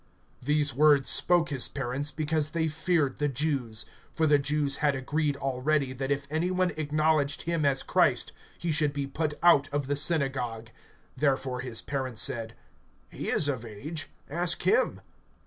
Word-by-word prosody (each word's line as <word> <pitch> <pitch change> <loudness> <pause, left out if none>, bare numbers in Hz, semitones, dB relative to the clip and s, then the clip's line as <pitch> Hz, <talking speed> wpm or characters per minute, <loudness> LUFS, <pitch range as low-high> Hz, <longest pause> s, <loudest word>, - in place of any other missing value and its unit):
(22)These 145 0 +1
words 145 0 +4
spoke 175 -2 +3
his 135 -4 +3
parents, 135 +2 -2
because 155 -1 -1
they 160 0 -1
feared 160 -3 0
the 145 - +1
Jews; 135 -6 -1 0.3
for 160 - 0
the 145 -2 +4
Jews 145 0 0
had 145 -2 +1
agreed 145 +2 -1
already, 135 +1 -1
that 135 +1 -4
if 140 0 -1
any 160 +3 0
one 185 -1 +1
acknowledged 155 -1 0
him 165 -3 -1
as 135 -1 +1
Christ, - - +2 0.3
he 170 - -2
should 150 -1 +1
be 140 -1 -2
put 150 +2 -3
out 145 -5 +5
of 145 -1 -1
the 145 +2 -1
synagogue. 135 -7 0 0.5
(23)Therefore 135 -3 0
his 125 -3 -4
parents 130 -5 -3
said: 115 -1 -2 0.6
He - - -5
is 145 - +2
of 130 -5 -2
age; 145 +9 -6 0.2
ask 175 +3 +1
him. 475 +3 +2
145 Hz, 165 wpm, -28 LUFS, 135-155 Hz, 0.6 s, out